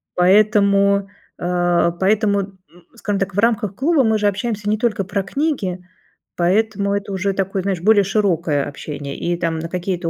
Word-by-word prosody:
поэтому, 200 +1 +3 0.3
а, 175 -1 +1
поэтому, 200 +3 +1
м, 195 -1 -6 0.4
скажем 205 0 -2
так, 195 -1 -3
в - - 0
рамках 220 -3 +1
клуба 290 - +2
мы 220 -2 +2
же 205 - +2
общаемся 210 0 -2
не 215 - +1
только 215 -3 0
про 200 +1 -2
книги, 210 - -2 0.6
поэтому, 200 +2 +1
это 200 0 -3
уже 195 +1 -1
такое, 195 0 -2
знаешь, 190 -3 -2
более 210 +1 +4
широкое 175 -7 0
общение 145 0 -7
и 175 0 -1
там 165 -2 -2
на 165 0 -5
какие-то 180 -1 -3
195 Hz, 165 wpm, -19 LUFS, 180-210 Hz, 0.6 s, более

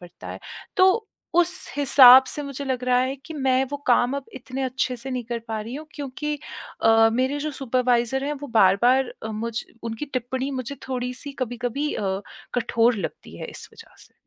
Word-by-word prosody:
पड़ता 175 -1 -12
है। - - -6 0.4
तो 380 +4 +4 0.3
उस 350 0 +4 0.2
हिसाब 265 -2 +9
से 295 - -2
मुझे 280 0 -5
लग 260 -2 -2
रहा 250 0 +3
है 260 +1 0
कि 320 - -8
मैं 265 -2 +2
वो 285 - -2
काम 245 +1 +3
अब 280 - -5
इतने 260 +1 -6
अच्छे 255 -1 -1
से 260 +3 -7
नहीं 250 -2 -3
कर 235 +1 -3
पा 220 -1 -2
रही 230 +4 -7
हूँ। 310 +2 -7
क्योंकि 295 +1 -4 0.5
अ, 225 0 +6
मेरे 260 +4 0
जो 305 - -2
सुपरवाइज़र 255 -1 0
हैं 290 - -1
वो 285 - -4
बार-बार 240 +7 +4
अ, 220 - -4
मुझ 225 +2 -3 0.2
उनकी 230 +3 -4
टिप्पणी 255 +2 -2
मुझे 255 +3 -6
थोड़ी 250 -1 -2
सी 285 +2 -6
कभी-कभी 245 +4 -2
अ, 195 -1 -2 0.3
कठोर 235 -1 +2
लगती 195 - -6
है - - -5
इस - - -9
वजह 455 - -15
से। - - -25
255 Hz, 195 wpm, -24 LUFS, 235-275 Hz, 0.5 s, हिसाब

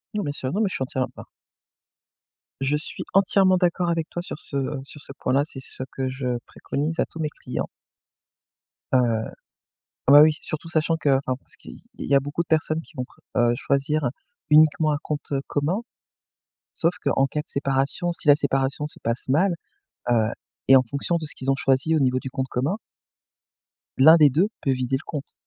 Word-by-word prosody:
Non, 210 - -1
bien 145 - -2
sûr 130 -2 -3
non, 205 - 0
mais 210 - +2
je - - -5
suis - - -1
entière 130 0 -2
à - - -12
bah - - -10 1.4
Je 140 +2 +1
suis 150 - -2
entièrement 190 -1 +4
d'accord 180 -1 +1
avec 165 -1 -1
toi 175 - -4
sur 175 - -4
ce 140 - -5 0.3
sur 145 +2 -4
ce - - -5
point-là, 130 +2 +2
c'est 145 -3 -6
ce 130 - -2
que 130 -1 -3
je 130 -2 -2
préconise 155 +4 -4
à - - +3
tous 165 - -12
mes 155 -1 -1
clients. - - -5 1.3
Heu, 130 - +6 1.1
ah, - - +7
bah 145 +1 +10
oui, 155 0 +6
surtout 155 +2 -4
sachant 165 0 +1
qu'enfin 135 -4 +1
parce - - -11
qu'il - - -12 0.2
il - - -6
y 140 - +2
a - - +7
beaucoup 145 +4 -3
de - - -17
personnes 155 0 +1
qui 170 - -18
vont 125 - -2
pre - - -22 0.2
heu, 120 0 +3
choisir 140 +1 0 0.4
uniquement 155 0 +5
un - - +1
compte, 150 -1 -5
heu, 135 - +1
commun 160 +10 -1 0.9
sauf 165 +1 +1
qu'en 135 - +2
cas 150 - -3
de 150 - -10
séparation, 140 +5 0
si 170 -2 -2
la 145 - +9
séparation 140 0 0
se 150 - -4
passe 115 +3 -2
mal 175 +7 +3 0.6
heu 110 -2 +3 0.4
et 135 - +9
en 130 - +3
fonction 140 +7 0
de 160 - -3
ce 150 - +3
qu'ils 135 +1 0
ont - - +2
choisi 135 +4 +2
au - - +2
niveau 130 -2 +2
du 130 - -6
compte 130 0 -3
commun 140 +11 -1 1.2
l'un 155 +5 +8
des 150 -3 +6
2 170 +9 +2
peut 135 - +1
vider 130 0 0
le 135 - -12
compte. 145 -2 -6
145 Hz, 205 wpm, -24 LUFS, 135-160 Hz, 1.4 s, bah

